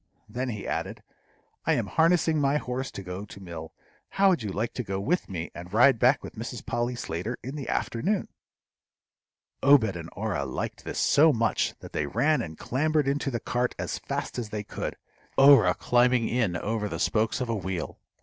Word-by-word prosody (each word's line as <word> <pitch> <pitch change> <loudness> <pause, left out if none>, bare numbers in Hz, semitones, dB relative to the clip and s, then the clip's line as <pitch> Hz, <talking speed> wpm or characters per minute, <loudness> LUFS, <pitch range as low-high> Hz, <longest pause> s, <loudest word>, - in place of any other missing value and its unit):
Then 125 +1 -3
he 105 -4 -5
added, - - -3 0.6
"I - - +2
am - - 0
harnessing 160 -2 +3
my 140 +1 +3
horse 130 -1 -3
to 100 - -8
go 90 +2 -6
to 100 - -12
mill; 85 -4 -8 0.4
how 195 0 +4
would 175 -8 +2
you 105 -3 -3
like 110 +5 -2
to 125 - -3
go 95 -2 -3
with 165 - 0
me, 85 -3 -5
and 90 +1 -9
ride 120 +3 +5
back 125 +3 +4
with - - -8
Mrs. 115 +1 -7
Polly 120 +1 -1
Slater 110 +1 -4
in 130 +4 -6
the 140 -3 -5
afternoon?" 185 - -1 1.3
Obed 130 -8 +5
and 85 -1 -7
Orah 100 -9 -2
liked 65 - -5
this - - -5
so 155 +2 +5
much 115 -3 0
that - - -11
they 75 - -1
ran 150 - +2
and 80 -2 -7
clambered 150 +2 0
into 140 0 0
the 120 -3 -2
cart 125 +2 -1
as - - -3
fast - - -4
as 115 -3 -4
they 105 -1 -4
could, - - -5 0.4
Orah 135 -10 +7
climbing 120 -1 +3
in 110 -7 0
over 105 +4 -2
the - - -4
spokes 110 0 +1
of 125 - -2
a - - +1
wheel. 95 -5 -4
120 Hz, 195 wpm, -27 LUFS, 100-135 Hz, 1.3 s, Orah